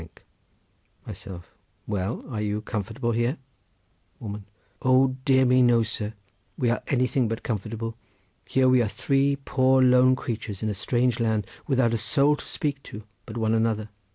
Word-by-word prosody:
Myself.—Well, 95 +3 -6
are 110 -6 -4
you 105 0 -2
comfortable 115 +3 -3
here? 120 +5 0 0.8
Woman.—O 120 +5 -1
dear 130 -1 +4
me, 125 +1 +4
no, 120 -2 +4
sir! 110 0 -4 0.4
we 120 -2 +1
are 120 - -1
anything 125 -1 +1
but 115 +1 -4
comfortable. 115 +1 -4 0.5
Here 130 -1 +2
we 130 -1 +5
are 115 - +1
three 135 +5 +1
poor 130 -1 +2
lone 125 0 +5
creatures 110 -5 -5
in 110 - 0
a - - -1
strange 120 +5 0
land, 110 -3 +1 0.2
without 130 -4 +2
a 115 - 0
soul 140 +5 +3
to - - -9
speak 140 -2 -3
to 105 -4 -10 0.2
but 115 - -7
one 110 -1 +1
another. 110 -1 0
120 Hz, 150 wpm, -25 LUFS, 110-130 Hz, 0.8 s, we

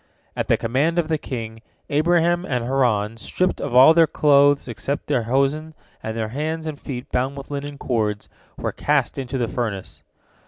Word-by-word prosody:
At - - -2
the - - +3
command 140 +9 0
of 165 -2 +1
the 160 -1 0
king, 115 -4 -6 0.3
Abraham 170 +3 +2
and 125 -8 -2
Haran, 115 -5 +1
stripped 180 +11 -1
of 120 - -3
all 130 +5 +9
their 165 -1 +5
clothes 145 -2 +4
except 135 +4 -4
their 120 - +1
hosen, 145 +4 0 0.3
and 110 +1 -5
their 110 -1 -2
hands 155 +5 -3
and 155 -2 -5
feet 125 -3 -7
bound 130 +3 -1
with 140 +1 -9
linen 145 0 -5
cords, 105 -6 -2 0.3
were - - -2
cast 145 -2 0
into 135 0 -4
the 120 -2 0
furnace. 110 -6 -4
135 Hz, 180 wpm, -22 LUFS, 120-150 Hz, 0.3 s, all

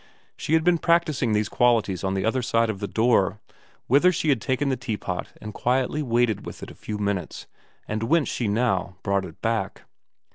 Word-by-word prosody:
She 155 - -3
had 160 0 +4
been 175 -1 +3
practis 170 -4 +2
ing 115 -4 +1
these 105 -1 +1
qualities 115 -8 +1
on 95 0 -1
the 95 - -1
other 125 +3 +1
side 115 -1 +1
of 100 - -8
the 100 - -3
door, 110 -3 +2 0.5
whither 145 +8 +5
she 160 -2 -1
had 130 -6 +2
taken 130 +4 0
the 130 - +1
teapot 105 -7 -4
and 105 0 -8
quietly 130 +6 0
waited 120 -5 +1
with - - -9
it - - -8
a - - -11
few 105 - -6
minutes, 100 -5 -3 0.4
and 110 0 -3
whence 150 +6 +2
she 120 - -2
now 100 -4 0
brought 100 -1 0
it 80 -3 -12
back. 110 -4 -2
115 Hz, 205 wpm, -24 LUFS, 100-130 Hz, 0.5 s, whither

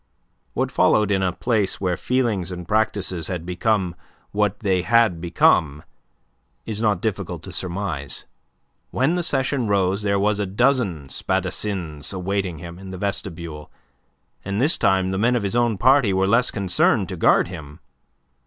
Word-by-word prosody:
What - - 0
followed 105 -1 +3
in 95 -1 +2
a 95 -1 +1
place 110 0 -1
where 90 -2 0
feelings 110 -6 -1
and 90 -1 -7
practices 100 -6 0
had 90 -3 -4
become 90 0 0 0.4
what 105 -1 0
they 95 -4 +1
had 110 -4 +3
become 75 -3 +2 0.8
is 110 -1 -4
not 105 -5 +1
difficult 110 -4 -3
to - - -9
surmise. 90 -6 -3 0.6
When 135 +7 +1
the 180 - 0
session 135 -5 0
rose, 100 0 +1
there 100 -1 +1
were 105 +2 +2
a 100 - -1
dozen 100 - +1
spadassins 90 -2 -2
awaiting 95 -2 -2
him 85 +1 -9
in 95 0 -9
the 95 - -6
vestibule, 85 -6 -4 0.7
and 100 +1 -2
this 145 +6 +3
time 95 -2 +2
the 95 - -2
men 120 +4 +3
of 120 - 0
his 100 +3 -2
own 120 -3 +2
party 130 -3 +4
were 95 0 +2
less 115 +5 +3
concerned 100 -4 +1
to - - -4
guard - - +3
him. 75 -4 -9
95 Hz, 160 wpm, -22 LUFS, 90-110 Hz, 0.8 s, party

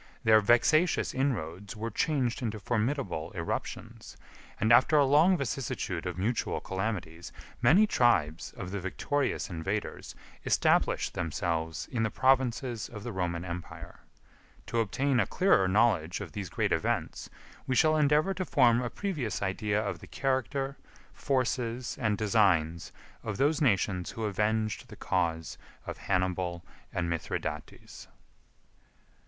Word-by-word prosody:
Their 110 0 +6
vexatious 140 - +3
inroads 100 - -2
were 115 +2 -4
changed 135 0 0
into 110 -3 -3
formidable 110 - -2
irruptions, 85 -2 -5 0.4
and, 110 +2 +4
after 130 +6 +5
a 145 - +5
long 155 +7 +5
vicissitude 135 - -3
of 90 -1 -4
mutual 110 +6 -1
calamities, 95 -4 -4 0.3
many 165 - +6
tribes 90 - +1
of 90 -1 -7
the 100 - -3
victorious 135 +10 -1
invaders 95 +5 -4 0.3
established - - +2
themselves 80 -1 -2
in 120 -4 -1
the 110 - +1
provinces 130 -2 +1
of 105 -3 -9
the 120 - -4
Roman 90 -3 -2
Empire. 85 -1 -8 0.7
To 115 - -1
obtain 130 +4 +1
a - - +2
clearer 180 - +3
knowledge 95 -5 +2
of 95 -6 -7
these 100 -1 -5
great - - -1
events, - - -1 0.4
we 130 - 0
shall 155 +3 +4
endeavor 150 +5 +3
to 190 - -3
form 125 -8 +4
a 120 - -2
previous 125 - -3
idea 105 +2 0
of 105 - -3
the - - -12
character, 135 +1 -2 0.4
forces, 125 -2 -1
and 110 -3 +1
designs 95 -7 +2 0.3
of 105 -3 -4
those 150 +4 +2
nations 95 - +1
who 115 - -6
avenged 110 +1 -1
the - - -10
cause 80 -2 -2 0.3
of - - -6
Hannibal 90 -2 -1 0.3
and 85 -1 -2
Mithridates. 80 -2 -5
110 Hz, 135 wpm, -29 LUFS, 90-130 Hz, 0.7 s, Their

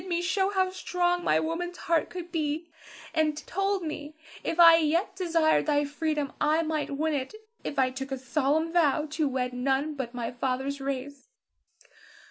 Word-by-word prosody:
He - - -12
bid - - -8
me 345 -1 0
show 380 +1 +1
how 375 -2 +1
strong 355 -1 0
my - - +3
woman's 350 +2 -3
heart 335 -1 0
could 350 -1 -7
be, 315 0 -2 0.5
and 310 -2 +1
told 390 0 -1
me 305 -1 -6 0.3
if 330 - -2
I 335 -1 +10
yet 330 +4 +1
desired 335 -5 +2
thy 290 -1 +2
freedom, 295 -1 -2 0.2
I 315 +2 +3
might 310 -3 -2
win 315 +1 0
it 275 +6 -3 0.3
if - - -5
I 260 -1 +3
took 270 +1 -6
a 270 - -1
solemn 295 +5 0
vow 305 -3 +3
to 310 -1 0
wed 255 -2 -2
none 270 +4 0
but 265 -4 -3
of 240 - -16
my 235 -2 -3
father's 265 +3 -2
race. 275 - -5
310 Hz, 185 wpm, -28 LUFS, 275-340 Hz, 0.5 s, I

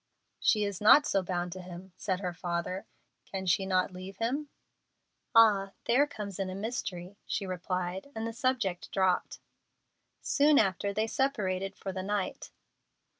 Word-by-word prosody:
"She 210 -2 +3
is 200 -2 -3
not 285 +8 +8
so 195 - +2
bound 180 -1 -2
to 185 +1 -6
him," 180 +1 -10
said 190 -1 -2
her 180 -2 -2
father; 175 +1 -3 0.4
"can 190 -1 -4
she 185 +2 +2
not 185 0 +1
leave 185 +1 -8
him?" 275 +7 -1 0.9
"Ah! 200 -4 +6
there 265 +5 +4
comes 200 -8 -6
in 190 -1 -1
a 185 - -5
mystery," 200 -3 -4
she 200 - -2
replied, 185 +3 -3
and 220 0 -3
the 230 - -3
subject 235 -7 -1
dropped. 190 -2 +1 0.8
Soon 290 0 +4
after, 200 -2 +2
they 215 +2 0
separated 200 -8 -1
for 195 - -5
the 185 0 -4
night. 200 0 -2
195 Hz, 155 wpm, -30 LUFS, 185-220 Hz, 0.9 s, not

